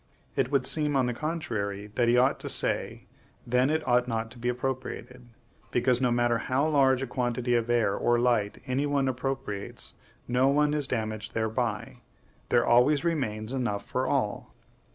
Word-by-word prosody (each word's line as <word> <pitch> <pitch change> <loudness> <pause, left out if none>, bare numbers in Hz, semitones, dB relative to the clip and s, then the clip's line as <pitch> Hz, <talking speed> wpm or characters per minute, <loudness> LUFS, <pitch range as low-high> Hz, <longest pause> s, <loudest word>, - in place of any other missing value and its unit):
It - - +1
would 140 -3 +2
seem, 150 -2 +3
on 130 -2 +3
the 125 - -1
contrary, 110 -9 -4
that 120 +1 +1
he 120 +1 +4
ought 130 +2 +3
to - - -5
say, - - 0 0.4
Then 125 +3 +2
it 155 +1 -1
ought 125 0 +3
not 115 -1 -3
to 120 - -12
be 120 +1 -1
appropriated. 125 0 -5 0.4
Because, 125 0 +1
no 125 - +3
matter 120 -1 +1
how 135 +4 0
large 135 -3 +3
a - - -1
quantity 125 -1 -1
of 120 -1 +1
air 120 -4 +2
or 120 0 +2
light 120 -4 0
any 135 +2 -1
one 140 -2 +1
appropriates, 130 -6 -3 0.3
no 125 +2 +2
one 145 +1 +2
is 150 -3 0
damaged 110 -2 -4
thereby; 110 0 -2 0.5
there - - +3
always 130 +5 +4
remains 125 -9 -2
enough 105 -6 -2
for 130 +1 -2
all. 125 -7 -2
125 Hz, 175 wpm, -27 LUFS, 115-135 Hz, 0.5 s, he